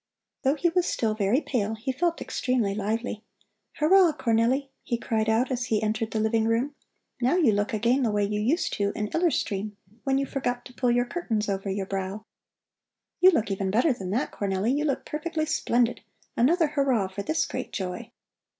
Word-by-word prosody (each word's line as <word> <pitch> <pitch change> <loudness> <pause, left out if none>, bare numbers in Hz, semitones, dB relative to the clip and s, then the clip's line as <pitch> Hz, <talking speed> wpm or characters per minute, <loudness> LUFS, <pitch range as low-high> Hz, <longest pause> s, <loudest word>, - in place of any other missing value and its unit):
Though 270 +2 +2
he 345 +3 +2
was 355 +1 +1
still 220 -2 0
very 215 +6 +1
pale, 225 -7 -1
he 225 +4 -3
felt 335 +6 -1
extremely 240 -6 0
lively. 215 +2 -2 0.5
"Hurrah, 350 +1 +5
Cornelli!" 245 +4 +1
he 240 - -2
cried 220 -1 -1
out 235 +4 +2
as 250 -1 -1
he 220 -3 0
entered 215 +1 -1
the 220 - -2
living 220 +1 +2
room. 235 +6 +1 0.5
"Now 250 +7 +3
you 315 -11 +4
look 205 +3 0
again 235 +5 +2
the 240 - +2
way 210 -1 +1
you 210 +1 -2
used 285 - +1
to 200 0 +1
in 210 -1 -2
Iller 340 +6 +2
Stream 205 -6 -2 0.3
when 270 -1 +1
you 275 - +1
forgot 245 -3 -3
to 250 - -12
pull 245 0 0
your 245 +1 +3
curtains 235 -8 -2
over 195 0 -2
your 195 0 -2
brow. 195 +2 -4 0.9
You 370 - +8
even 205 - 0
look - - 0
better 250 - +3
than 190 -6 -6
that, 230 +8 -1
Cornelli, 200 +5 0
you 295 +1 0
look 280 -3 -1
perfectly 310 +1 -2
splendid! 245 -6 +1 0.3
Another 315 +6 +3
hurrah 270 -9 +1
for 190 +2 -6
this 315 +10 0
great - - -5
joy!" 190 +4 -4
235 Hz, 195 wpm, -26 LUFS, 210-275 Hz, 0.9 s, You